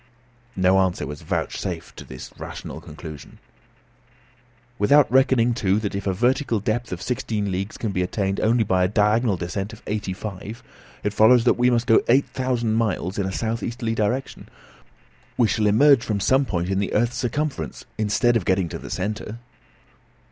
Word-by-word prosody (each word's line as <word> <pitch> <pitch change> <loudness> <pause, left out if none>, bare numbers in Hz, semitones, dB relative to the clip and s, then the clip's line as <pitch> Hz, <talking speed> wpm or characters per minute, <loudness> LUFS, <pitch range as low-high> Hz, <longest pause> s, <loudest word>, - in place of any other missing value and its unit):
No 95 +1 +3
answer 95 -2 0
was 75 +1 -7
vouchsafed - - -4
to - - -8
this 65 - -10
rational - - -7
conclusion. 75 -1 -10 1.4
"Without 145 +8 +5
reckoning, 130 -2 +4
too, 100 -4 +1
that 105 -2 -2
if 100 0 -4
a - - +2
vertical 120 +1 +1
depth 115 +3 -2
of 90 +1 -5
sixteen 105 -5 -2
leagues 95 +3 -3
can 110 - -3
be 90 - -1
attained 95 +1 -1
only 115 +1 +3
by 95 -3 +1
a - - +3
diagonal 105 +1 +2
descent 95 +5 -4
of 110 - -13
eighty 105 -2 -3
four, 95 0 -6 0.6
it 105 - -1
follows 115 +3 +5
that 125 - +4
we 125 +1 +2
must 120 -1 +1
go 115 - +5
eight 135 +4 +5
thousand 125 -4 -1
miles 105 -4 -1
in 95 - 0
a - - -3
south 115 +3 -2
easterly 115 -1 -3
direction; 115 +5 -2
so - - -23 0.8
that - - -34
we 120 - +4
shall 105 -1 +1
emerge 135 +5 +5
from 105 -4 -1
some 130 +7 +3
point 90 -5 -2
in 95 - +1
the 100 - -2
earth's 120 +2 +1
circumference 140 +4 -3
instead 115 +3 +2
of 115 - +1
getting 95 -1 +1
to - - -6
the - - -9
centre!" 105 +3 -4
110 Hz, 185 wpm, -23 LUFS, 95-120 Hz, 1.4 s, Without